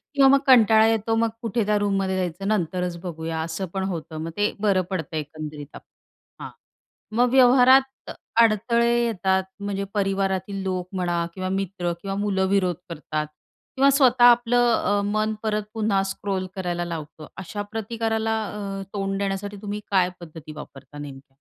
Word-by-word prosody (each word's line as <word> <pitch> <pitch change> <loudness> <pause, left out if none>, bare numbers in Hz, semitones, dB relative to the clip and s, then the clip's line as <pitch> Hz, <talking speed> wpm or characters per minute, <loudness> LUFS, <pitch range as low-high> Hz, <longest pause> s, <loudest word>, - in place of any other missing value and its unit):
किंवा 275 -1 +6
मग 275 - +6
कंटाळा 220 -4 +6
येतो, 225 0 +1
मग 230 0 +2
कुठे 230 -1 0
त्या 210 0 +2
रूममध्ये 195 -2 0
जायचं, 185 +2 -3
नंतरच 180 -3 -1
बघूया 160 -2 -4
असं 165 +3 -4
पण 190 - -1
होतं. 165 -4 -5
मग 165 - -4
ते 205 0 +1
बरं 200 -3 +2
पडतं 165 -3 -4
एकंदरीत 150 -1 -6
आपण. - - -12 0.6
हां, - - -6 0.7
मग 245 +1 +3
व्यवहारात 260 +1 +5 0.3
अडथळे 235 +2 +3
येतात 190 -4 +1 0.2
म्हणजे 200 -1 -3
परिवारातील 195 -1 -1
लोक 185 -1 -3
म्हणा 175 -2 0
किंवा 185 -1 -3
मित्र 190 -2 -2
किंवा 195 -1 -3
मुलं 190 -2 +1
विरोध 185 -4 +1
करतात 155 -1 -3 0.5
किंवा 275 +1 +5
स्वतः 255 -3 +4
आपलं 245 0 +5 0.2
अ, 205 0 +2
मन 215 +1 0
परत 215 -1 0
पुन्हा 210 -3 +1
स्क्रॉल 195 -1 -3
करायला 175 -2 -2
लावतं. 155 -2 -7
अशा 205 +3 -5
प्रतिकाराला 225 0 -1
अ, 195 -1 -5
तोंड 195 -1 -2
देण्यासाठी 200 +1 -3
तुम्ही 205 0 -4
काय 185 -2 +3
पद्धती 160 -2 -10
वापरता 140 -1 -11
नेमक्या? 140 -2 -10
195 Hz, 155 wpm, -24 LUFS, 175-220 Hz, 0.7 s, किंवा